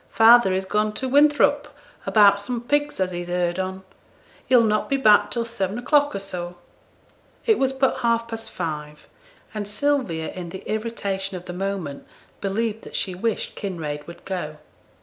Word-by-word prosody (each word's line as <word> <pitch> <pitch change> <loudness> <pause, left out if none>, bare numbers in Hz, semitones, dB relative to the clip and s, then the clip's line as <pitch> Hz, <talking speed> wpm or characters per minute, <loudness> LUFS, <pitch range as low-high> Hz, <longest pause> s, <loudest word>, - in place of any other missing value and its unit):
'Father 225 -2 +6
is 190 +1 -1
gone 210 +2 0
to 260 +5 -2
Winthrop 290 +2 +4 0.4
about 200 -2 +6
some 235 +4 -3
pigs 290 +3 -1
as 185 -1 0
he's 175 0 -5
heerd 175 0 -1
on. 190 0 -4 0.6
He'll 250 -2 +6
not 215 -1 +1
be 275 - +2
back 215 -6 +5
till 235 -1 -1
seven 200 -3 -3
o'clock 290 +1 +2
or - - -2
so.' 180 -2 -6 0.9
It 445 -3 +3
was 265 -1 +2
but 265 0 +1
half 230 -1 +1
past 225 -1 -6
five, 150 -3 -6 0.5
and 210 -2 -4
Sylvia 210 - -1
in 180 -2 -7
the 190 +2 -9
irritation 200 -4 -3
of 180 - -11
the 175 - -6
moment 185 -6 -4 0.3
believed 220 +2 -1
that - - -10
she 185 - -1
wished 220 +5 -2
Kinraid 155 -7 -5
would 170 - -12
go. 165 -5 -4
200 Hz, 170 wpm, -23 LUFS, 180-235 Hz, 0.9 s, Father